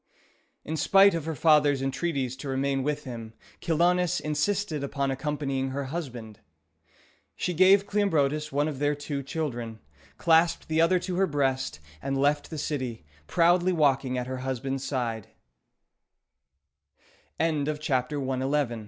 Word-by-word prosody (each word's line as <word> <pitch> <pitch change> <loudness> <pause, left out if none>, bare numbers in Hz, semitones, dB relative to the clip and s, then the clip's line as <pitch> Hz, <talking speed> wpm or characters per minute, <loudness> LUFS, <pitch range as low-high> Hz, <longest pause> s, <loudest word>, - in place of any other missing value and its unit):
In 160 +1 -3
spite 195 +4 +5
of 165 -3 -3
her 160 -1 -3
father's 150 -1 +4
entreaties 135 -1 -2
to 135 +1 -6
remain 135 0 0
with 150 +2 -2
him, 115 -4 -8 0.3
Chilonis 175 +2 +2
insisted 155 +1 -1
upon 140 -1 -1
accompanying 135 -1 -2
her 140 +2 -3
husband. 120 - -6 1.0
She 180 - -2
gave 190 +3 +5
Cleombrotus 155 -8 +1
one 145 +2 +1
of 145 -4 -5
their 145 0 +1
two 145 -1 -4
children, 120 -6 -4 0.4
clasped 165 0 +3
the 160 +1 +2
other 175 +3 +4
to 180 0 -3
her 195 0 +3
breast, 135 - -1 0.2
and 135 0 -2
left 145 +2 +1
the 160 - -6
city, 130 - -4 0.2
proudly 175 +2 +3
walking 135 -5 +2
at 125 - -2
her 130 +1 -4
husb 130 -1 -4
145 Hz, 125 wpm, -27 LUFS, 135-165 Hz, 1.0 s, spite